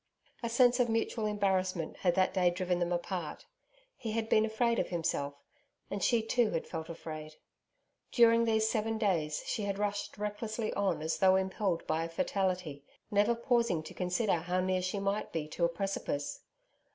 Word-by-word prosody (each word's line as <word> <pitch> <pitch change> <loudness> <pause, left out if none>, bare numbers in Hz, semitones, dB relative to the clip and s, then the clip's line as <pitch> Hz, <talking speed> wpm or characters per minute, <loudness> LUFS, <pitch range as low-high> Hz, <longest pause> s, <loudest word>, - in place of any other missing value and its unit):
A 235 - -2
sense 245 +1 +4
of 245 -1 +3
mutual 225 -1 0
embarrassment 190 -5 0
had 175 -2 +1
that 185 0 +2
day 185 -2 +4
driven 180 0 -1
them 175 0 0
apart. 175 -1 -3 0.5
He 225 -2 -5
had 225 0 -1
been 215 - +5
afraid 230 +1 +1
of - - -1
himself, 145 -4 -1 0.6
and 200 - -2
she 235 -3 +3
too 230 0 +2
had 165 - -2
felt 160 -1 -6
afraid. 155 -2 -7 0.8
During 230 -1 +5
these 220 -1 +2
seven 225 0 0
days 170 -8 0
she 220 - -2
had 200 -1 -2
rushed 205 0 -2
recklessly 215 +2 -3
on 195 -6 0
as 160 - -1
though 190 0 +6
impelled 190 -1 0
by 160 +1 0
a 165 - -4
fatality, 180 -4 -1 0.3
never 210 +3 +3
pausing 235 -8 +1
to - - -9
consider 180 +2 +1
how 180 +3 -1
near 185 0 +1
she 185 +2 -2
might 200 +1 -1
be 155 -2 -3
to 170 +2 0
a - - +2
precipice. 170 -5 -3
195 Hz, 175 wpm, -32 LUFS, 175-220 Hz, 0.8 s, though